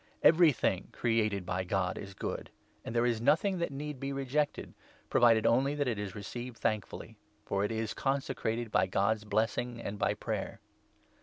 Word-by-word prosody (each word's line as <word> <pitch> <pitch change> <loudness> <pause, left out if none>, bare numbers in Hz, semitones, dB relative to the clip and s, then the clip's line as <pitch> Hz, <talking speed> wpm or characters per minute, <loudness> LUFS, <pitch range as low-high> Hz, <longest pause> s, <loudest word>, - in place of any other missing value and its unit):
Everything 155 - +4
created 110 -5 0
by 95 +1 -1
God 95 0 0
is 95 -1 -8
good, - - -4 0.3
and 115 - -6
there 120 +1 +3
is 115 -2 +1
nothing 185 - +3
4 - - -5
that 170 - -1
need 145 0 -5
be 135 +1 -3
rejected 140 +2 -1 0.2
— - - -30
provided 115 -2 +5
only 135 +4 +3
that 145 -2 0
it 115 -4 -1
is 100 -3 -5
received 120 +4 -6
thankfully; 105 -2 -3 0.3
for 100 0 0
it 105 - 0
is 110 -1 -2
consecrated 120 -4 -1
by 95 - +3
God's 100 +3 +1
blessing 115 +3 0
and' 105 -3 -5
]by - - +2
5 - - -16
prayer. - - -3
115 Hz, 180 wpm, -31 LUFS, 105-135 Hz, 0.3 s, provided